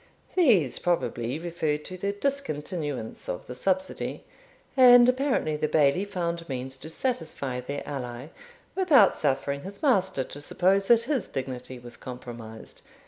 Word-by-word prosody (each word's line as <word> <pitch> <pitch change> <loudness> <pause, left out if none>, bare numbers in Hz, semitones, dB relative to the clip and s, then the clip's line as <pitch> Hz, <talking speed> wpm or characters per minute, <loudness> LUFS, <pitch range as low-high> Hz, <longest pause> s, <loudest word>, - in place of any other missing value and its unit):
These 215 - +4
probably 130 -7 -1
referred 160 -3 -2
to 185 - -7
the 200 +2 -2
discontinuance 165 - -3
of 90 - -4
the 125 - -7
subsidy, 185 +8 -2 0.5
and 245 -2 +8
apparently 255 - +1
the 155 - 0
Bailie 150 +5 +3
found 170 -4 -3
means 130 0 -4
to 155 - -9
satisfy 160 - -3
their 140 +3 -5
ally, 130 -1 -5 0.4
without 305 - +5
suffering 140 0 -1
his 200 - -10
master 190 - +2
to 145 - -9
suppose 190 +6 +2
that 235 -1 +5
his 260 -3 -1
dignity 130 -1 -5
was 120 -1 -11
compromised. 120 -3 -9
160 Hz, 140 wpm, -27 LUFS, 130-200 Hz, 0.5 s, and